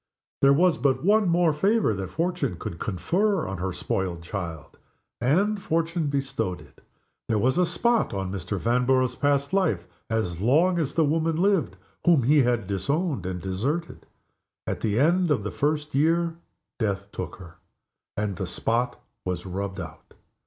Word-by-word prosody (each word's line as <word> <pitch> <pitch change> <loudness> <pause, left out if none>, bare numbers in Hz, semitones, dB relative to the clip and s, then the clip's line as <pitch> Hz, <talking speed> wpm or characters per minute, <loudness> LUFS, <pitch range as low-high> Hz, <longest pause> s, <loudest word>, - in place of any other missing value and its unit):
There 140 - +6
was 170 +4 +4
but 130 -1 +1
one 210 -1 +4
more 170 -2 +3
favor 200 - +2
that 95 -2 -4
Fortune 175 - -1
could 85 0 -6
confer 180 - 0
on 95 -1 -5
her 95 +1 -2
spoiled 90 -1 -3
child 85 -5 -6 0.4
and 195 - +2
Fortune 165 -1 0
bestowed 135 -9 -2
it. - - -18 0.5
There 110 - +2
was 125 +5 +2
a 180 - +3
spot 235 +7 +1
on 95 -1 -3
Mr. 100 +1 -3
Vanborough's 125 +3 +2
past 140 +3 0
life 110 - +1 0.2
as 95 -6 -1
long 165 - +3
as 145 -4 -2
the 160 - +4
woman 160 +2 +1
lived 190 +1 +1 0.3
whom 165 -7 +4
he 145 +4 +5
had 120 -4 +1
disowned 135 - -1
and 90 -1 -3
deserted. 120 - -3 0.6
At - - -3
the 110 +1 0
end 175 +4 +3
of 140 -8 +1
the 105 - -3
first 150 0 -1
year 165 +4 +2 0.4
Death 100 -3 -2
took 90 -2 -5
her 85 -3 -13 0.6
and 100 -3 -2
the - - -3
spot 120 +2 -1 0.2
was 90 0 -3
rubbed 95 +1 -4
out. - - -10
135 Hz, 160 wpm, -26 LUFS, -, 0.6 s, There